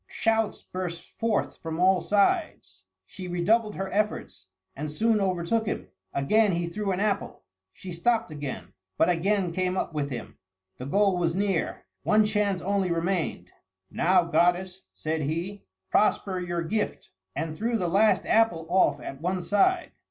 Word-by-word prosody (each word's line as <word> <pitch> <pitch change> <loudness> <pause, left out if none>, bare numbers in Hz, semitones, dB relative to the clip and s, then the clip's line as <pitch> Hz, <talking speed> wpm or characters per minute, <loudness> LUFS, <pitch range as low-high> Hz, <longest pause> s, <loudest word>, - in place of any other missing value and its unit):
Shouts 225 -1 0
burst 175 -2 -6
forth 225 -2 0
from 160 0 -5
all 185 0 +4
sides. 310 - 0 0.2
She 185 -1 -9
redoubled 210 +5 +1
her 195 +1 -3
efforts, 195 - -2 0.3
and 150 +2 -4
soon 220 +8 +2
overtook 190 +4 0
him. - - -3 0.2
Again 205 +9 +3
he 170 0 0
threw 195 +4 -2
an 185 - -1
apple. 205 -1 -1 0.3
She 180 - -9
stopped 225 +3 +1
again, 135 - -6 0.2
but 170 - +4
again 185 +1 +1
came 185 +1 0
up 175 - -2
with 145 -2 -2
him. 120 -4 -7 0.4
The 125 - -5
goal 195 +3 +3
was 170 -1 0
near; 195 -3 -1 0.2
one 215 0 +4
chance 205 -3 0
only 195 -1 +1
remained. 165 - -1 0.4
"Now, 180 +1 +3
goddess," 180 +3 +1
said 155 0 -2
he, 170 +7 -3 0.3
"prosper 195 -3 +2
your 175 -1 -2
gift!" 210 +6 -3 0.2
and 155 +2 -3
threw 230 +5 0
the 180 -4 -1
last 205 +5 +3
apple 220 -8 +3
off 185 +2 +3
at 135 - -8
one 180 +1 -1
side. 345 - +2
185 Hz, 155 wpm, -27 LUFS, 170-210 Hz, 0.4 s, all